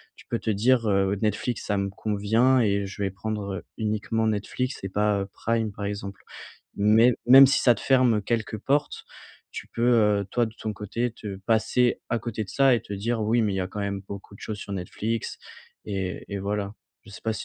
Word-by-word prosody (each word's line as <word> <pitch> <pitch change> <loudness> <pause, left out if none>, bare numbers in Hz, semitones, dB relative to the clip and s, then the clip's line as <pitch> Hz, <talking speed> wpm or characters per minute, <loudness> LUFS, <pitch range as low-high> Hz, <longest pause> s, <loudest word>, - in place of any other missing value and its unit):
tu - - -17
peux 115 - -1
te - - -3
dire: 115 +3 +2
«Heu, 100 0 +2
Netflix 110 +3 -1
ça 100 - 0
me 100 0 -1
convient 110 +6 +2
et 100 -2 +1
je 100 +1 -8
vais 95 - -1
prendre, 100 0 -4
heu, - - -6
uniquement 110 +1 -1
Netflix 110 +5 -2
et 95 - -3
pas, 105 +1 +1
heu, - - -2
Prime.» 115 -1 -1
par 100 - -6
exemple, 100 -1 -5 0.6
mais, 110 +4 +5
même 135 +2 +10
si 135 - +2
ça 120 - +5
te - - -9
ferme 125 -5 +3
quelques 110 0 -2
portes, 145 +6 -1 0.5
tu - - -7
peux, 115 - -4
heu, 105 -4 +4
toi 120 -1 +1
de 110 - -10
ton 110 - -3
côté 105 +4 -3
te 105 -3 -7
passer 120 +2 +2
à 115 - 0
côté 110 -1 -4
de - - -18
ça 135 +2 +4
et - - -3
te - - -9
dire: 110 +4 -1
«Oui 115 +2 +2
mais 105 -2 +1
il - - -2
y - - 0
a 90 - -1
quand 105 +2 -6
même 100 -1 -2
beaucoup 100 0 -9
de - - -21
choses 105 -1 -5
sur 100 - -7
Netflix» 105 +4 -3 0.5
et 95 -3 -4
et 100 - -2
voilà. 100 +1 -3 0.3
Je - - -12
sais 95 -3 -10
pas 110 -1 -1
si - - -6
105 Hz, 225 wpm, -26 LUFS, 100-115 Hz, 0.6 s, même